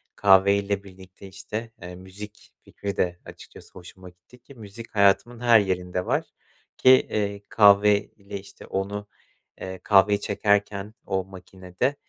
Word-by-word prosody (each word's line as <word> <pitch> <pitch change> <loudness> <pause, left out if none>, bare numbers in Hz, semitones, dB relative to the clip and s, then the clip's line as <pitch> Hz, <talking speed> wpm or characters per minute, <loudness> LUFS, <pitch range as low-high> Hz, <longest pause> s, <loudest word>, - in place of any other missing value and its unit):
kahveyle 100 0 +3
birlikte, 95 0 -14
işte, 105 +4 -7
eee, 90 0 -9
müzik 100 +3 -12
fikri 100 -1 -7
de 90 -1 -1
açıkçası - - -14
hoşuma 90 0 -13
gitti 90 +8 -22
ki 130 +3 -17
müzik 110 +1 -12
hayatımın 100 +4 +2
her 120 -2 +5
yerinde 90 -2 -2
var. - - -1 0.5
Ki, 130 - +4
eee, 100 -5 +2
kahve 100 -1 +5
ile, 100 -1 -10
işte, 95 - -14
onu, 100 +1 -4 0.5
eee, 95 0 -7
kahveyi 100 0 +4
çekerken 100 0 -1
o 95 -1 -1
makinede, 95 +6 -4
100 Hz, 135 wpm, -24 LUFS, 95-105 Hz, 0.5 s, her